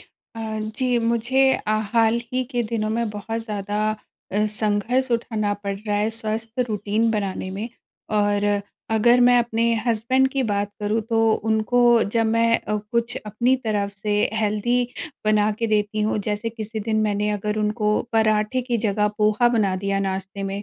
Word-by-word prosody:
अ, 220 -2 -8 0.2
जी 250 -2 +2
मुझे 235 +3 +2
अ, 215 - -2 0.2
हाल 230 0 +3
ही 255 0 0
के 240 -1 0
दिनों 215 -1 0
में 235 -1 0
बहुत 215 +2 -4
ज़्यादा 205 -1 -3 0.5
अ, 210 +2 +2 0.2
संघर्ष 225 +5 +1
उठाना 220 -3 0
पड़ 200 0 -2
रहा 205 0 -2
है 210 +2 +1
स्वस्थ 225 +2 -3
रूटीन 215 +2 0
बनाने 195 -3 -2
में। 205 +5 -4 0.5
और 205 0 +1 0.5
अगर 235 +3 +4
मैं 245 0 +6
अपने 235 -1 0 0.2
हस्बैंड 240 +4 +2
की 270 0 -1
बात 205 0 -1
करूँ 210 +2 0
तो 225 - +1 0.3
उनको 220 +2 +1 0.3
जब 230 -1 +2
मैं 230 +1 +3
अ, 210 - -2 0.2
कुछ 235 +1 0
अपनी 235 +5 +2
तरफ़ 205 -2 0
से 205 +1 -3 0.2
हेल्दी 215 +2 0 0.5
बना 215 0 +3
के 230 - 0
देती 210 0 +1
हूँ। 215 - 0
जैसे 210 +2 -1
किसी 220 -1 -6
दिन 215 +1 0
मैंने 205 0 0
अगर 210 +1 -2
उनको 210 0 0 0.2
पराठे 215 +2 +2
की 240 - +2
जगह 210 0 +2
पोहा 215 +3 +3
बना 215 -5 +1
दिया 195 0 0
नाश्ते 195 0 -3
में, 195 +1 -3
215 Hz, 165 wpm, -23 LUFS, 210-230 Hz, 0.5 s, मैं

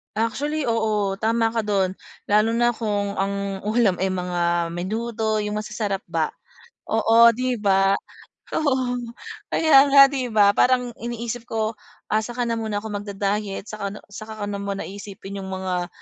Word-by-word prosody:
Actually, 285 +8 -1
oo 215 -3 0
tama 225 +1 +1
ka 225 -1 -2
dun 195 -2 0 0.3
lalo 215 +2 +3
na 240 +1 +3
kung 205 -3 -2
ang 195 0 -2
ulam 215 -4 +2
ay 190 0 0
mga 175 -2 0
menudo 215 +5 -2
yung 210 0 -3
masasarap 210 -2 -3
ba - - -1 0.6
oo 230 +1 +5
'di 250 0 -1
ba 195 -1 +3 0.5
oo 290 -4 +1 0.7
kaya 285 -3 +5
nga 280 0 +8
'di 260 -3 -2
ba, 210 -3 +5
parang 250 +2 +2
iniisip 235 0 -5
ko, 220 -1 -1 0.4
ah, 215 - +4
saka 240 +3 -3
na 230 -1 -1
muna 215 -2 -3
ko 220 - -5
magda-diet, 205 0 -3
saka 200 -1 -5
na - - -9
saka 215 +1 -7
ko - - 0
na 200 - -4
muna 200 0 -3
iisipin 200 0 -8
yung 190 - -6
mga, 185 -2 -2
215 Hz, 155 wpm, -23 LUFS, 200-230 Hz, 0.7 s, nga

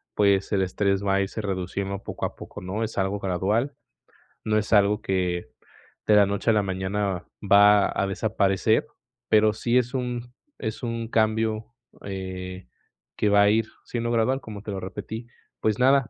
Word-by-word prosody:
pues, 100 -2 +3
el 100 - +3
estrés 100 +1 0
va 100 -1 +2
a 100 - +2
irse 100 +3 -3
reduciendo 100 0 -3
poco - - -4
a - - -5
poco, - - -9
¿no?, 95 +5 -3
es 110 - -8
algo 95 +1 0
gradual, 100 +9 0 0.7
no 110 0 +1
es 105 - -2
algo 105 0 +4
que 90 -5 -1 0.6
de 105 - +6
la 105 -1 +7
noche 100 +3 -1
a - - +6
la 105 -1 +2
mañana 95 0 -2 0.2
va 100 0 +6
a 100 - +1
desaparecer, 100 +1 +1 0.4
pero 110 0 +5
sí 120 +2 +1
es 125 0 +1
un 125 -1 -3 0.2
es 110 0 -5
un 115 -1 -3
cambio, 110 -1 +1 0.4
eh, 95 -3 -6 0.5
que 105 - +1
va 100 0 +6
a 100 - +5
ir 110 +1 +2 0.2
siendo 120 -1 -2
gradual, 120 +4 +1
como 105 -4 -8
te 105 - -6
lo 95 -1 -4
repetí. 110 +4 -6 0.4
Pues, 110 0 +1
nada, 135 0 +4
105 Hz, 175 wpm, -25 LUFS, 95-110 Hz, 0.7 s, la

